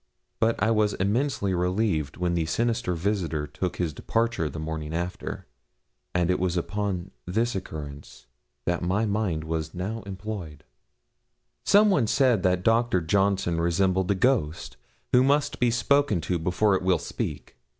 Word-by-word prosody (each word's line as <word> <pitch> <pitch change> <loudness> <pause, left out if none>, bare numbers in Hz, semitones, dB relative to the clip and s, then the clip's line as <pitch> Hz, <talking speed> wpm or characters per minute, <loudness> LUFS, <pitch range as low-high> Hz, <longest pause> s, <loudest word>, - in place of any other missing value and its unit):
But 115 0 +3
I 110 - +3
was 105 -2 +2
immensely 100 0 0
relieved 90 -4 0
when 90 -1 0
the 85 -2 0
sinister 115 -1 0
visitor 85 -5 -1
took 85 +5 -4
his 85 -4 -2
departure 115 -3 -1
the 75 - -8
morning 80 0 -4
after, 85 +2 -4 0.7
and 90 0 +2
it 90 - 0
was 90 -1 0
upon 95 0 -2 0.2
this 115 +6 0
occurrence 70 -9 -7 0.4
that 85 0 0
my 95 +5 +1
mind 100 -7 -1
was 80 0 -3
now 105 +6 -3
employed. 95 -6 -6 1.0
Some 210 +1 +6
one 140 - +2
said 125 -4 +3
that 90 0 +1
Dr. 115 -3 +3
Johnson 95 0 +1
resembled 95 +2 +1
a 100 - +3
ghost, 95 - 0 0.4
who 125 - +6
must 145 0 +1
be 125 - +3
spoken 120 -1 +2
to 85 +2 -1
before 90 +5 +2
it 95 - +1
will 95 0 +3
speak. - - -5
95 Hz, 150 wpm, -26 LUFS, 85-110 Hz, 1.0 s, Some